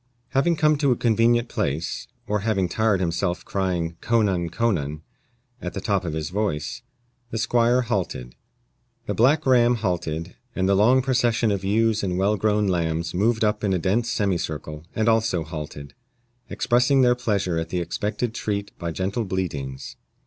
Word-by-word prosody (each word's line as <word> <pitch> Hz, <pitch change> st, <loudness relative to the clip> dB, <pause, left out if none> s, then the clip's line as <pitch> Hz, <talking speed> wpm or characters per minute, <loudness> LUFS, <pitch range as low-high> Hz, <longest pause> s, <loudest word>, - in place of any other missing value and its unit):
Having 140 Hz, +6 st, +2 dB
come 155 Hz, -1 st, +3 dB
to 140 Hz, -3 st, +3 dB
a -, -, +3 dB
convenient 120 Hz, +1 st, +2 dB
place, 75 Hz, -2 st, -2 dB, 0.2 s
or 105 Hz, 0 st, 0 dB
having 100 Hz, -3 st, 0 dB
tired 105 Hz, +2 st, +1 dB
himself 85 Hz, 0 st, -1 dB
crying 90 Hz, -4 st, -2 dB
co 115 Hz, -1 st, +2 dB
nan, 90 Hz, -4 st, 0 dB
co 115 Hz, +7 st, +1 dB
nan, 75 Hz, -3 st, -3 dB, 0.6 s
at -, -, -5 dB
the -, -, -2 dB
top 100 Hz, -4 st, 0 dB
of 85 Hz, -3 st, -3 dB
his 80 Hz, +1 st, -3 dB
voice, 105 Hz, -, -2 dB, 0.5 s
the 115 Hz, -, -4 dB
squire 120 Hz, +2 st, +2 dB
halted. 90 Hz, -, -3 dB, 0.7 s
The -, -, -2 dB
black 140 Hz, +7 st, +3 dB
ram 125 Hz, -2 st, +5 dB
halted, 90 Hz, -5 st, -3 dB, 0.2 s
and 95 Hz, 0 st, +1 dB
the 100 Hz, -, +4 dB
long 120 Hz, +6 st, +4 dB
procession 120 Hz, -4 st, +2 dB
of 100 Hz, -1 st, -2 dB
ewes 110 Hz, +2 st, +2 dB
and 90 Hz, -2 st, -1 dB
well 100 Hz, +3 st, +2 dB
grown 105 Hz, +1 st, +1 dB
lambs 85 Hz, -2 st, -1 dB
moved 110 Hz, +5 st, +1 dB
up 105 Hz, 0 st, +1 dB
in 100 Hz, -2 st, +1 dB
a -, -, +2 dB
dense 105 Hz, +7 st, 0 dB
semicircle, 80 Hz, -7 st, -2 dB
and 110 Hz, 0 st, +1 dB
also 110 Hz, -6 st, +2 dB
halted, 75 Hz, -3 st, -7 dB, 0.6 s
expressing 125 Hz, +3 st, +3 dB
their 125 Hz, -1 st, +5 dB
pleasure 100 Hz, -8 st, -1 dB
at 80 Hz, 0 st, -4 dB
the 90 Hz, -, -2 dB
expected 105 Hz, +6 st, -2 dB
treat 100 Hz, -3 st, -3 dB
by 85 Hz, -, -3 dB
gentle 95 Hz, +7 st, -2 dB
bleatings. 80 Hz, -9 st, -4 dB
100 Hz, 170 wpm, -24 LUFS, 85-115 Hz, 0.7 s, ram